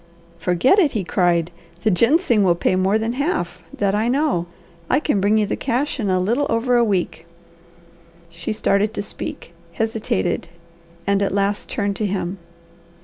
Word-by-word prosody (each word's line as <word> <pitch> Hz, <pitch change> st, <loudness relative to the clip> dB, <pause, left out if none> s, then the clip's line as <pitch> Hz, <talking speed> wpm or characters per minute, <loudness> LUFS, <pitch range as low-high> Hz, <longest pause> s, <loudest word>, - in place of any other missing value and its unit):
"Forget 180 Hz, -, +3 dB
it!" 315 Hz, -8 st, +3 dB
he 215 Hz, -4 st, -1 dB
cried. 175 Hz, -1 st, +1 dB, 0.3 s
"The 215 Hz, -, +3 dB
ginseng 235 Hz, -, +3 dB
will 175 Hz, -3 st, +4 dB
pay 180 Hz, -, +1 dB
more 190 Hz, +3 st, +2 dB
than 225 Hz, +2 st, -2 dB
half; 265 Hz, -, -2 dB
that 200 Hz, -1 st, 0 dB
I 215 Hz, +3 st, +1 dB
know. 255 Hz, -, +1 dB, 0.4 s
I -, -, +3 dB
can 290 Hz, -10 st, 0 dB
bring 205 Hz, +2 st, +3 dB
you 215 Hz, -, +2 dB
the -, -, -2 dB
cash 265 Hz, +3 st, -1 dB
in 210 Hz, -4 st, -1 dB
a 185 Hz, 0 st, +2 dB
little 235 Hz, +10 st, +1 dB
over 235 Hz, +2 st, +1 dB
a 240 Hz, -, +5 dB
week." 190 Hz, -5 st, -1 dB, 1.0 s
She 170 Hz, 0 st, -5 dB
started 215 Hz, 0 st, +1 dB
to -, -, -2 dB
speak, -, -, -7 dB, 0.2 s
hesitated, 220 Hz, -, -1 dB, 0.6 s
and 200 Hz, 0 st, +2 dB
at 200 Hz, -, +1 dB
last 200 Hz, +1 st, -1 dB
turned 200 Hz, -4 st, -1 dB
to 215 Hz, -, 0 dB
him. 190 Hz, -1 st, -3 dB
205 Hz, 170 wpm, -21 LUFS, 185-235 Hz, 1.0 s, a